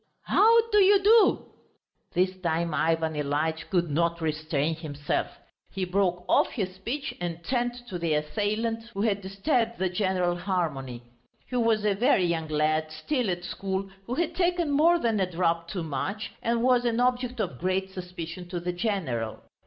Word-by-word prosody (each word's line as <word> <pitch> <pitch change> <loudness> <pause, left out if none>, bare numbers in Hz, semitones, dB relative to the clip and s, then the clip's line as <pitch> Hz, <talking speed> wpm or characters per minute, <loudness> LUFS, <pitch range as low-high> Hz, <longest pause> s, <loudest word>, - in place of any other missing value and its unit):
"How 455 +2 +5
do 420 - +5
you 395 0 +5
do!" 440 +1 +5 0.7
This 185 +1 +2
time 170 -1 0
Ivan 160 +1 +1
Ilyitch 150 +2 -1
could 175 -4 +1
not 170 +2 +1
restrain 155 -1 -1
himself. 150 -2 -2 0.4
He 190 -1 -3
broke 180 -1 0
off - - +4
his 190 -5 -3
speech 235 +10 -4
and 170 -1 -4
turned 245 +2 -1
to 180 -6 -5
the 165 -2 +1
assailant 215 +8 -1
who 200 - -1
had 205 -3 +1
disturbed 230 +5 0
the 190 0 0
general 180 -2 0
harmony. 150 -10 -3 0.4
He 250 - -6
was 225 -3 +2
a 205 - +3
very 195 -3 +3
young 165 -2 -1
lad, 155 +1 0
still 225 - -1
at 175 -1 -2
school, 190 +1 -3 0.2
who 245 - -2
had 335 +2 0
taken 350 -3 +1
more 325 +5 +5
than 230 -8 0
a 185 -1 +1
drop 170 -1 0
too 175 -1 -4
much, 195 +8 -3
and 235 0 0
was 250 -1 +4
an 235 -1 0
object 250 0 0
of 135 - -3
great 190 +1 -1
suspicion 180 -1 -7
to 175 -1 -3
the 175 +1 -3
general. 175 - -2
185 Hz, 170 wpm, -27 LUFS, 165-230 Hz, 0.7 s, How